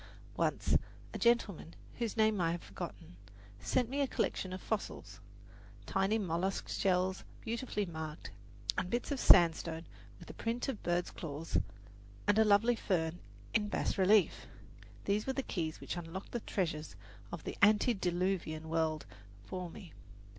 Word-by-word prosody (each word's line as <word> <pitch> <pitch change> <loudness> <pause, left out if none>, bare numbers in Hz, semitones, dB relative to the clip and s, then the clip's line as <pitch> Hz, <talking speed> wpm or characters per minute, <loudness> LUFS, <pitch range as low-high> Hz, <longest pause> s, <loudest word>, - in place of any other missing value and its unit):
Once - - +1 0.4
a - - -4
gentleman, 220 -8 +2 0.2
whose 230 -1 -2
name 215 -3 +4
I 165 -1 +2
have 175 - -5
forgotten, 95 -2 -8 0.4
sent 250 - +1
me 275 +4 -1
a 275 - +2
collection 190 -6 -1
of 185 - -4
fossils 215 +2 -4 0.7
tiny 195 +3 +2
mollusk 190 -1 -1
shells 185 0 +1 0.2
beautifully 230 -2 -2
marked, 160 -3 -6 0.5
and 185 -1 -3
bits 240 +6 -1
of 280 - -1
sandstone 165 -3 +5 0.3
with - - -13
the - - -8
print 230 +2 -2
of 265 -6 -3
birds' 175 0 0
claws, 160 0 -2 0.7
and 205 +1 +4
a - - +8
lovely 215 +3 +5
fern 175 -5 0 0.3
in 210 -2 +2
bas - - 0
relief. 195 +1 +4 0.6
These 205 +3 +1
were 265 - +1
the 270 - -1
keys 160 -7 -3
which - - -4
unlocked 175 +2 -6
the 240 - -1
treasures 165 -8 -2 0.4
of - - -6
the - - -4
antediluvian 185 -6 +2
world 160 -1 0 0.4
for 180 -2 -4
me. 175 0 -11
190 Hz, 145 wpm, -34 LUFS, 165-220 Hz, 0.7 s, a